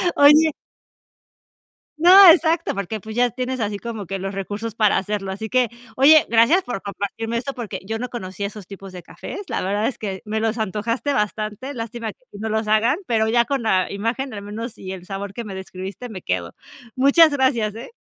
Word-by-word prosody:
Oye. 300 +2 +6 1.5
No, 365 +3 +9
exacto, 330 0 +2
porque 200 +2 -4
pues 220 +3 -9
ya 245 +1 +3
tienes 255 +1 -4
así 205 -2 -2
como 225 -1 -6
que 195 - -3
los 195 +1 -5
recursos 205 +3 -5
para 215 -3 +3
hacerlo. 195 0 -3
Así 210 +3 -6
que 255 -2 +2 0.3
oye, 300 +4 +6
gracias 235 +12 +4
por 245 - -5
compartirme 225 +3 -4
esto 275 +3 -4
porque 240 -5 -6
yo 225 +2 -3
no 250 - -4
conocía 200 -3 -5
esos 210 -2 -10
tipos 195 0 -10
de 180 -1 -10
cafés, 400 - -8
la - - -2
verdad 205 +3 0
es 265 - -4
que 195 -3 -5
me 215 +1 -2
los 225 +1 -1
antojaste 225 +6 -2
bastante. 215 +3 -3
Lástima 230 -2 -5
que 255 - -36
aquí 205 - -13
no 220 +1 -3
los 220 0 -1
hagan, 225 +7 +3
pero 220 -4 +1
ya 235 +1 +3
con 275 -1 -1
la 190 -4 +1
imagen, 230 +6 -3
al 205 - -6
menos 215 +3 -7
y 190 - -7
el 180 -2 -10
sabor 195 +1 -6
que 235 - -5
me 205 -3 -8
describiste 190 +5 -7
me 190 -4 -8
quedo. 90 - -3 0.4
Muchas 280 +5 +6
gracias, 255 -6 +1
¿eh? 230 - -9
220 Hz, 205 wpm, -21 LUFS, 200-250 Hz, 1.5 s, No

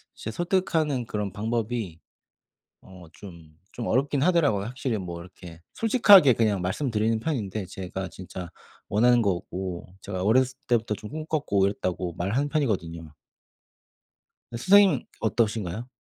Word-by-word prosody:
이제 110 - -6
설득하는 160 - 0
그런 105 -3 -3
방법이 110 -4 -3 0.8
어 90 -2 -14
좀 85 -6 -13 0.2
좀 120 - -5
어렵긴 135 +3 +1
하더라고요. 145 - +2
확실히 125 -2 -3
뭐 85 -2 -6
이렇게 85 -2 -12
솔직하게 205 - +6
그냥 105 -5 +1
말씀드리는 110 +2 0
편인데 110 - -3
"제가 95 0 -6
진짜 90 0 -9 0.4
원하는 120 +3 +4
거고 90 -2 -3
제가 95 +1 -4
어렸을 130 +4 +2
때부터 115 -3 +1
좀 105 0 -9
꿈꿨고 150 -10 -1
이랬다."고 90 -3 -3
말하는 115 +13 -1
편이거든요. 85 - -2 1.4
선생님은 185 +4 +4 0.2
어떠신가요? 110 0 -1
110 Hz, 320 characters per minute, -26 LUFS, 95-130 Hz, 1.4 s, 솔직하게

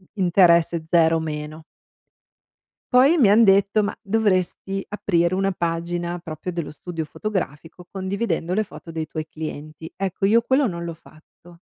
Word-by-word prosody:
interesse 170 -3 +3
0-. 160 -2 0 1.3
Poi 275 +7 +6
mi 245 -11 +5
han 220 +3 +6
detto, 200 +1 +4
ma 205 - -3
dovresti 195 -2 0
aprire 175 -4 0
una 195 +1 +1
pagina 175 0 -2
proprio 165 +1 -6
dello 170 -3 -4
studio 160 +1 -6
fotografico 175 -3 -5
condividendo 190 -2 -2
le 215 +3 +1
foto 180 - -12
dei 160 -1 -3
tuoi 155 0 -5
clienti. 155 0 -8
Ecco, 195 0 -1
io 230 +3 +4
quello 265 +3 +2
non 170 -5 -4
l'ho 170 - -4
fatto 165 +2 -19
175 Hz, 140 wpm, -22 LUFS, 165-195 Hz, 1.3 s, Poi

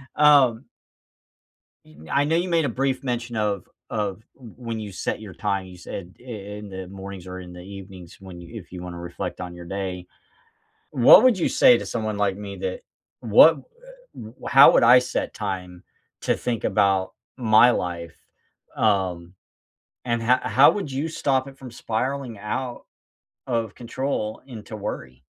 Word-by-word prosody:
Um 140 -5 +5 1.2
Yo 75 +1 -15
I 140 +1 +2
know 160 +3 +1
you 180 +2 0
made 165 -2 +2
a 140 - 0
brief 130 +1 -1
mention 120 -2 -3
of 105 -4 -1 0.2
of 105 -1 -3
w 120 -5 -14
when 115 -3 -5
you 105 -2 -7
set 90 - -3
your 105 -3 -10
time. 100 -3 -2
You 90 - -12
said 90 0 -8
i - - -18
in 105 -3 -8
the 95 -1 -7
mornings 95 -1 -9
or 95 0 -7
in 90 -1 -10
the 90 - -10
evenings, 95 -2 -11
when 95 -2 -11
you 105 +6 -9
if 90 - -19
you 90 - -7
wanna 90 -1 -7
reflect 85 +1 -6
on 90 -1 -6
your 85 0 -10
day. 95 -1 -5 0.8
What 125 - +8
would 245 -6 +5
you 170 - +1
say 255 -2 +6
to - - -6
someone 110 -3 -3
like 100 -2 +1
me 100 -1 -7
that 95 0 -4 0.4
what 120 +8 +6
eh - - -16 0.3
how 135 +1 +8
would - - +4
I 120 +2 +8
set 125 - -3
time 90 -2 -5 0.4
to - - +1
think 120 -2 -3
about 95 -2 +2 0.2
my 120 0 +5
life, 85 -6 -4 0.6
um, 95 -5 0 0.7
and 120 -1 -1
h 125 +2 +3
how 135 +2 +6
would 195 -8 -4
you 145 +5 -2
stop 135 -4 0
it 135 - -14
from 130 -2 -10
spiraling 120 +1 -3
out 120 +4 -4 0.6
of 115 -4 -2
control 120 -3 -4
into 110 -4 -9
worry? 65 -11 -7
110 Hz, 170 wpm, -23 LUFS, 95-130 Hz, 1.2 s, What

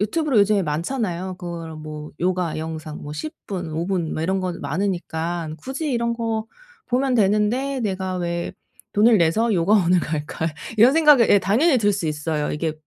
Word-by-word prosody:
유튜브로 275 +4 +1
요즘에 205 -1 +4
많잖아요. 180 - -2
그런 165 -3 -7
뭐 150 -1 -7
요가 180 -2 0
영상 155 -1 -6
뭐 145 - -7
10 155 0 -5
분, 175 -5 -4
5 165 +3 -2
분 180 -5 -1
뭐 155 - -2
이런 190 +3 0
거 185 -1 -2
많으니까 170 0 -2
굳이 280 +3 -3
이런 235 0 0
거 225 -1 -2 0.4
보면 255 +1 +1
되는데 225 +6 +1
내가 190 -3 -2
왜 170 -1 -3 0.4
돈을 215 +1 +5
내서 215 +8 +2
요가원을 180 0 +3
갈까? 155 0 -3 0.3
이런 235 +5 +7
생각이 300 -6 +6
예 205 - +6
당연히 245 - +3
들 205 -1 +2
수 190 -4 -2
있어요. 150 0 -2
이게 155 +1 -1
185 Hz, 315 characters per minute, -22 LUFS, 165-225 Hz, 0.4 s, 이런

